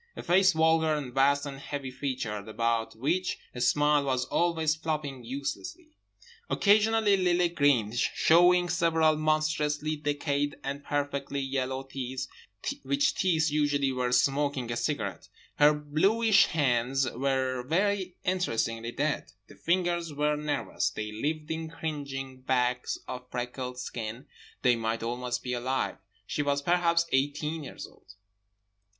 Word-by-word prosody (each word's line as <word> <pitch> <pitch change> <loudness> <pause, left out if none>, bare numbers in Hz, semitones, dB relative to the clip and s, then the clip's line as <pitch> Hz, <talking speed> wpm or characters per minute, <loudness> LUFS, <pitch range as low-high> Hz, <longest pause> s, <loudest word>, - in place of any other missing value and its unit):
A - - -7
face 190 +2 +4
vulgar 160 -1 +3
and 135 -5 -5
vast 140 +2 +3
and 135 -1 -6
heavy 140 -1 -5
featured, 125 -6 -4
about 115 +1 -1
which 165 +11 -1 0.2
a 125 - -6
smile 145 +3 +3
was 130 -2 0
always 165 -1 +1
flopping 150 -5 -4
uselessly. 140 - -5 0.6
Occasionally 215 0 +4
Lily 180 -2 +2
grinned, 130 -9 +2
showing 175 +5 +4
several 165 -2 +3
monstrously 155 0 0
decayed 145 -1 -1
and 140 +1 -4
perfectly 140 -1 -2
yellow 130 -1 -2
teeth, 130 -1 -5 0.6
which 140 +1 +1
teeth 160 -4 +1
usually 145 -2 +1
were 125 -1 -1
smoking 135 -1 +1
a - - -1
cigarette. - - -3 0.3
Her 145 0 +7
bluish 195 +9 +3
hands 135 -3 +1
were 130 0 -1
very 185 +6 0
interestingly 115 -10 -1
dead; 145 - -1 0.2
the - - -15
fingers 175 -1 0
were 150 +1 +1
nervous, 150 0 -1
they 105 -1 -5
lived 150 +8 -3
in 160 0 -3
cringing 140 -5 -5
bags 125 -1 0
of 125 0 -7
freckled 125 +1 -4
skin, 120 0 -5 0.4
they 125 -2 +5
might 115 0 -2
almost 125 +1 -3
be 125 - -3
alive. 130 +2 -1 0.3
She - - -2
was 140 -1 0
perhaps 170 0 +3
eighteen 150 +3 0
years 135 - -8
old. 95 - -18
145 Hz, 130 wpm, -28 LUFS, 130-160 Hz, 0.6 s, Her